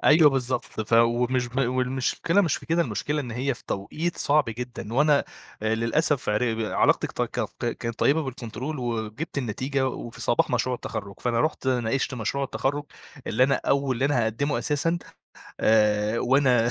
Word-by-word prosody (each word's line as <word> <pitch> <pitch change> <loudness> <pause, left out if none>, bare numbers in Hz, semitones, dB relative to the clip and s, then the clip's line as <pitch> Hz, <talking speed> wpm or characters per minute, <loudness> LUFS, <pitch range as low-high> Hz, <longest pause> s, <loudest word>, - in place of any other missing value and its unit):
أيوه 155 0 +6
بالضبط، 130 -2 -1 0.2
ف 110 +1 -5
ومش 120 +2 +3
ب 125 +2 -4
والمشكلة 130 +8 +1
مش 170 -8 +1
في - - -11
كده، 170 +1 +2
المشكلة 150 -2 -2
إن 125 -4 -6
هي 130 +4 -1
في - - -16
توقيت 155 - -3
صعب 150 +1 +3
جدًا، 115 -1 -6
وأنا 150 +1 +4 0.4
آآ 110 0 +1
للأسف 120 +4 0
عر 110 +2 +1
ب 115 - -4
علاقتي 110 - +2
كطت - - -3
تكط - - -4
كانت 115 0 -3
طيبة 155 +3 +3
بالكونترول 130 +2 -5
وجِبت 120 +5 -3
النتيجة 130 +3 -1
وفي 115 -2 -7
صباح 120 0 +2
مشروع 125 +1 +1
التخرُّج، 100 -4 -6
فأنا 120 -2 +1
رُحت 155 -3 -1
ناقشت 125 +1 0
مشروع 125 +4 -2
التخرُّج، 145 +2 -2 0.4
اللي 130 - +3
أنا 135 +1 +2
أو 140 -1 +2
اللي 130 +2 -1
أنا 140 -4 +2
هاقدّمه 140 +7 -1
أساسًا، 165 +3 0 0.6
آآ 105 0 +3
وأنا 125 -3 +3
125 Hz, 170 wpm, -25 LUFS, 115-140 Hz, 0.6 s, أيوه